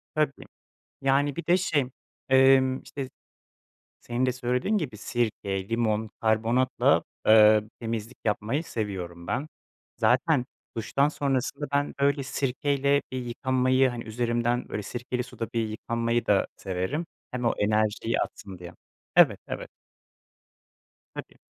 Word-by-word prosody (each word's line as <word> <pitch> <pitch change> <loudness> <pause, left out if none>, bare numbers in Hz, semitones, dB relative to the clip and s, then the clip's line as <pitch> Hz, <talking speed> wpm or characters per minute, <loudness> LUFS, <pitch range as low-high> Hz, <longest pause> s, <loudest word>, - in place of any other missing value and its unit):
Tabii, 150 -3 0 0.6
yani 135 +1 +2
bir 170 - -5
de 175 - +5
şey, 155 -7 +1 0.4
emm, 130 0 +5
işte 135 -2 -6 0.9
senin 120 +2 -1
de 125 - +1
söylediğin 125 - 0
gibi 140 - -4
sirke, 100 -4 -2
limon, 110 -2 0
karbonatla, 115 +3 +2 0.2
ııı, 110 -1 +7
temizlik 115 +1 -4
yapmayı 115 +8 0
seviyorum 90 - -5
ben. 140 +4 -2 0.5
Zaten 125 +5 +3 0.3
duştan 140 +5 +1
sonrasında 140 -1 -1
ben 145 0 +1
öyle 140 0 +2
sirkeyle 140 +1 0
bir 130 - -2
yıkanmayı, 130 +2 +2
hani 120 -2 -5
üzerimden 120 +2 -1
böyle 105 - -3
sirkeli 125 +4 -3
suda 115 -2 -6
yıkanmayı 115 +1 -1
da 100 -2 +3
severim, 95 - -3 0.2
hem 125 -1 -4
o 115 - +2
enerjiyi 110 +2 +1
atsın 95 -2 -6
diye. 85 -1 -10 0.4
Evet, - - +6
evet. - - -5 1.4
Tabii. - - -9
120 Hz, 120 wpm, -27 LUFS, 110-135 Hz, 1.4 s, ııı